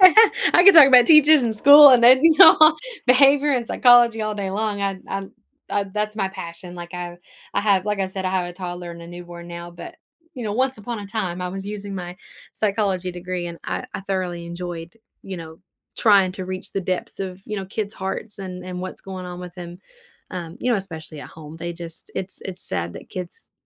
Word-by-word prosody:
I 375 -1 +6
can 395 -1 +8
talk 300 -4 +10
about 250 -3 +6
teachers 305 -2 +6
and 225 -2 -2
school 285 +5 +9
and 250 -2 +5
then, 255 +2 +7
you 325 -2 +5
know, - - +9 0.5
behavior 275 +3 +4
and 245 -3 -1
psychology 240 -3 +4
all 215 0 -3
day 195 -2 -4
long. 205 0 -3
I'd 195 -1 -3
I'd 195 0 -5 0.4
I'd 200 -1 -3
that's 210 0 -3
my 195 -3 -1
passion. 175 -1 -10
Like, 175 0 -9
I 175 -1 -7 0.4
I - - 0
have 200 -2 +1
like 210 -1 -2
I 195 - -1
said, 190 0 -7
I 185 - -1
have 185 -2 -1
a 175 - -8
toddler 175 -1 -7
and 170 0 -12
a - - -11
newborn 175 0 -11
now, 170 0 -8
but, 175 - -11 0.4
you 245 -3 -7
know, 210 - -3
once 260 +2 -1
upon 225 +1 -6
a 200 - -8
time, 190 -4 -4
I 180 - -3
was 195 +1 -7
using 205 -1 -7
my 180 -1 -7 0.4
psychology 195 -4 -1
degree, 175 0 -5
and 170 -1 -8
I - - -4
I - - -4
thoroughly 185 -3 -4
enjoyed, 170 0 -8 0.3
you 190 -1 -7
know, 160 -1 -10 0.4
trying 195 -4 +4
to 185 -1 -7
reach 185 0 -7
the 195 - -2
depths 185 0 -4
of, 185 -1 -6
you 210 - -5
know, 195 - -4
kids' 205 +1 -5
hearts 200 +3 -6
and 185 -2 -8
and 180 -1 -7
what's 185 0 -8
going 190 -1 -8
on 180 0 -8
with 180 -1 -10
them, 175 -1 -10 0.5
um, 170 -3 -7
you 250 - -1
know, 235 - +2
especially 160 -6 -8
at - - -10
home. 155 0 -12
They 170 +1 -5
just 165 -1 -11
it's 190 0 -6
it's 190 -1 -8
sad 85 -1 -4
that - - -12
kids 185 - -9
190 Hz, 225 wpm, -21 LUFS, 175-215 Hz, 0.5 s, talk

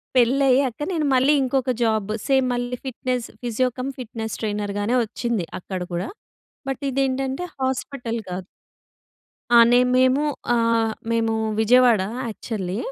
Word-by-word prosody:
పెళ్లయ్యాక 260 0 +3
నేను 320 -4 0
మళ్ళీ 265 +3 +4
ఇంకొక 260 0 0
జాబ్ 220 -2 0 0.2
సేమ్ 265 -2 +3
మళ్ళీ 245 0 -2
ఫిట్‍నెస్ 255 -1 -2
ఫిజియో 245 +1 0
కమ్ 265 +2 -2
ఫిట్‍నెస్ 225 -2 -5
ట్రైనర్‌గానే 205 +1 -1
వచ్చింది 225 -3 -2
అక్కడ 185 0 -5
కూడా. 175 +4 -2 0.6
బట్ 270 +1 -3
ఇదేంటంటే, 270 +2 -1 0.2
హాస్పిటల్ 260 -2 -2
కాదు. 180 0 -5 1.1
ఆ! - - +7 0.2
నేను 250 +1 +5
మేము 260 +2 +4 0.3
ఆహ్, 230 -1 +2 0.2
మేము 225 -1 +1 0.3
విజయవాడ 240 -1 +5 0.3
యాక్చువల్లీ 205 -3 -4
245 Hz, 120 wpm, -23 LUFS, 220-260 Hz, 1.1 s, ఆ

